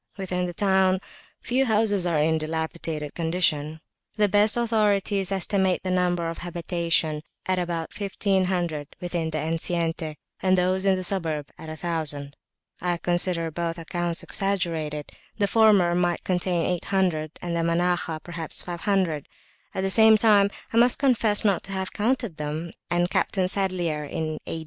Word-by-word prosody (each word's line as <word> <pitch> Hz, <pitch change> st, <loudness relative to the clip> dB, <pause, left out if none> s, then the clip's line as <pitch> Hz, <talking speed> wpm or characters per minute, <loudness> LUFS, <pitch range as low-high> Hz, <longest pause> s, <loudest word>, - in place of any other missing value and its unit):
Within 180 Hz, -2 st, -2 dB
the 175 Hz, -, -5 dB
town 190 Hz, -1 st, +3 dB, 0.4 s
few 260 Hz, +2 st, +1 dB
houses 210 Hz, -4 st, +2 dB
are 170 Hz, -3 st, +1 dB
in 160 Hz, +2 st, +3 dB
a 160 Hz, -, +1 dB
dilapidated 160 Hz, -1 st, -3 dB
condition. 160 Hz, -2 st, 0 dB, 0.4 s
The 210 Hz, -1 st, +4 dB
best 205 Hz, +3 st, +4 dB
authorities 205 Hz, -4 st, +1 dB
estimate 190 Hz, -1 st, +1 dB
the 185 Hz, -, -1 dB
number 175 Hz, -2 st, +1 dB
of 165 Hz, -, -5 dB
habitations 170 Hz, -3 st, -1 dB, 0.2 s
at 185 Hz, -1 st, +1 dB
about 170 Hz, -2 st, -3 dB
1500 185 Hz, -6 st, -1 dB
within 175 Hz, -3 st, -2 dB
the 155 Hz, -, -3 dB
enceinte, 165 Hz, 0 st, -2 dB, 0.3 s
and 185 Hz, 0 st, +3 dB
those 185 Hz, +2 st, +1 dB
in 190 Hz, -, +5 dB
the 185 Hz, -, -3 dB
suburb 160 Hz, -6 st, -1 dB
at 160 Hz, -, -9 dB
1000. 155 Hz, -3 st, -3 dB, 0.5 s
I 175 Hz, 0 st, 0 dB
consider 175 Hz, -1 st, 0 dB
both 170 Hz, +1 st, -3 dB
accounts 170 Hz, 0 st, -2 dB
exaggerated; 165 Hz, -7 st, -2 dB, 0.3 s
the 205 Hz, -, +2 dB
former 200 Hz, -4 st, +4 dB
might 175 Hz, -1 st, 0 dB
contain 180 Hz, -2 st, 0 dB
800, 180 Hz, -4 st, 0 dB
and 170 Hz, -1 st, -3 dB
the 170 Hz, -, +1 dB
Manakhah 170 Hz, -1 st, 0 dB
perhaps 170 Hz, -2 st, -3 dB
500; 175 Hz, -3 st, -1 dB, 0.5 s
at 190 Hz, -, -1 dB
the 195 Hz, 0 st, 0 dB
same 220 Hz, +1 st, +7 dB
time 205 Hz, -2 st, +5 dB, 0.2 s
I -, -, +1 dB
must 240 Hz, +1 st, +5 dB
confess 225 Hz, -6 st, +2 dB
not 200 Hz, -3 st, +3 dB
to 195 Hz, -, -6 dB
have 190 Hz, -1 st, -3 dB
counted 230 Hz, -5 st, -1 dB
them, 155 Hz, +3 st, -4 dB, 0.2 s
and 175 Hz, 0 st, +2 dB
Captain 185 Hz, +1 st, 0 dB
Sadlier 180 Hz, -6 st, -1 dB
(in 155 Hz, +1 st, -3 dB
A. 165 Hz, -, -3 dB
175 Hz, 155 wpm, -25 LUFS, 165-195 Hz, 0.5 s, same